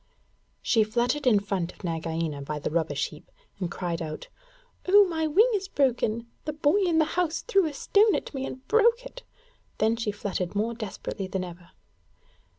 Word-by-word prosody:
She 225 -3 +4
fluttered 245 +6 0
in 215 -5 +6
front 195 -3 -2
of - - -19
Nagaina 165 -3 -2
by 150 +2 -4
the 150 - -3
rubbish 155 -3 0
heap, 150 - -15 0.3
and 180 -3 -2
cried 175 -1 -3
out, 155 -1 -6 0.6
'Oh, 405 +2 +7
my 320 -3 -1
wing 430 +11 +4
is 390 -2 -1
broken! 240 - 0 0.2
The 305 - -2
boy 300 +4 +2
in 350 -5 +2
the 315 - +4
house 335 0 -1
threw 395 -8 +2
a 300 - -5
stone 415 +8 +3
at - - -4
me 270 -1 -3
and 260 +1 -9
broke 465 +2 +3
it.' - - -9 0.6
Then 220 +1 +2
she 225 -2 -2
fluttered 200 -3 -4
more 220 +3 0
desperately 205 -3 -5
than 185 0 -3
ever. 175 -1 -10
230 Hz, 180 wpm, -27 LUFS, -, 0.6 s, Oh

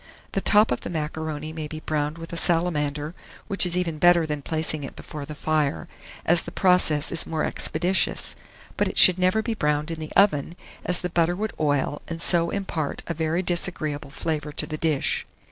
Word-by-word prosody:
The 195 - -1
top 210 +2 +4
of 125 - -1
the - - -6
macaroni 155 -1 -4
may 155 -1 -5
be 155 +1 -7
browned 150 0 -2
with 165 0 -9
a - - -3
salamander, 155 -3 0 0.3
which 195 -3 +2
is 175 0 +3
even 165 -4 -2
better 175 -1 +5
than 150 -2 -4
placing 155 0 -1
it 135 - -8
before 145 -2 -8
the 150 - -7
fire, 155 +1 -1 0.4
as 170 0 +4
the 170 - -8
process 180 -6 +3
is 170 - -2
more 160 -1 -2
expeditious; 180 +4 +1 0.4
but - - +1
it - - -5
should 185 -1 +8
never 185 +4 +2
be 230 - -2
browned 150 -4 -1
in 165 - -5
the 155 - -7
oven, 170 -5 +3 0.3
as 180 -1 +3
the 180 - -3
butter 170 0 +1
would 215 +3 -3
oil, 145 -1 0
and 165 0 -6
so 170 0 +2
impart 170 -7 -3
a 170 - -3
very 165 +3 -1
disagreeable 160 -5 -1
flavour 150 0 -3
to - - -1
the 155 - -5
dish. 155 -4 -1
160 Hz, 195 wpm, -24 LUFS, 150-175 Hz, 0.4 s, should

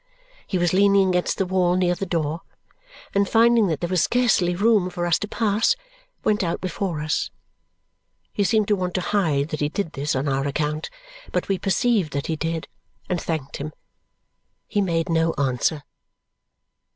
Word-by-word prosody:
He 190 - -1
was 175 0 +1
leaning 195 0 +4
against 180 -1 0
the 195 - +1
wall 180 -1 +2
near 180 -1 +2
the 195 +2 -4
door, 165 -1 -1 0.7
and 200 -1 +2
finding 230 -1 +5
that 160 -4 -2
there 175 - 0
was 185 -3 +2
scarcely 220 -8 +2
room 205 -1 +3
for 175 -1 -3
us 170 -2 +2
to 210 - -3
pass, 220 - +2 0.5
went 210 -1 +2
out 170 -1 -1
before 180 -3 -3
us. 155 - -1 1.0
He 205 - +1
seemed 215 +1 +2
to 205 - +4
want 180 -2 -3
to 185 - +1
hide 160 -8 +1
that 155 - -4
he 145 - 0
did 195 0 -3
this 145 +1 -1
on 135 +2 -1
our 135 0 0
account, 150 +2 -2 0.4
but - - -1
we 195 -2 0
perceived 200 - +1
that 140 0 -2
he 160 - -1
did, 165 +1 -3 0.4
and 180 -2 -1
thanked 155 -5 -3
him. 150 +2 -6 0.9
He 205 - 0
made 165 -4 0
no 165 0 +1
answer. 140 +2 0
180 Hz, 175 wpm, -23 LUFS, 155-200 Hz, 1.0 s, finding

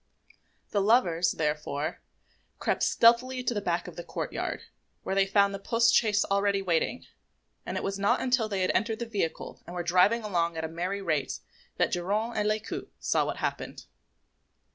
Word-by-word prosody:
The 205 - +1
lovers, 185 -6 +3
therefore, 150 -1 -2 0.6
crept - - -1
stealthily 250 +2 +4
to 240 - 0
the 205 - -2
back 175 -2 -1
of 180 - -10
the 175 - -5
courtyard, - - -4 0.4
where - - -2
they 195 0 +3
found 200 0 +3
the 195 - -4
post 230 +3 +3
chaise 215 -2 +3
already 200 0 +1
waiting; 175 -4 -1 0.6
and - - -3
it - - -3
was 195 0 -2
not 205 +6 +2
until 250 -4 +1
they 195 -2 -1
had 185 - +2
entered 220 0 0
the 235 - -4
vehicle 205 -8 -3
and 175 - -8
were 175 - -2
driving 185 +7 +3
along 170 -5 0
at 160 - -3
a - - -2
merry 180 +5 -3
rate 155 -6 -1 0.4
that - - +2
Geronte 205 +6 -1
and 210 - +1
Lescaut 215 0 -3
saw - - +1
what - - -3
had - - -1
happened. - - -7
200 Hz, 185 wpm, -28 LUFS, 175-220 Hz, 0.6 s, stealthily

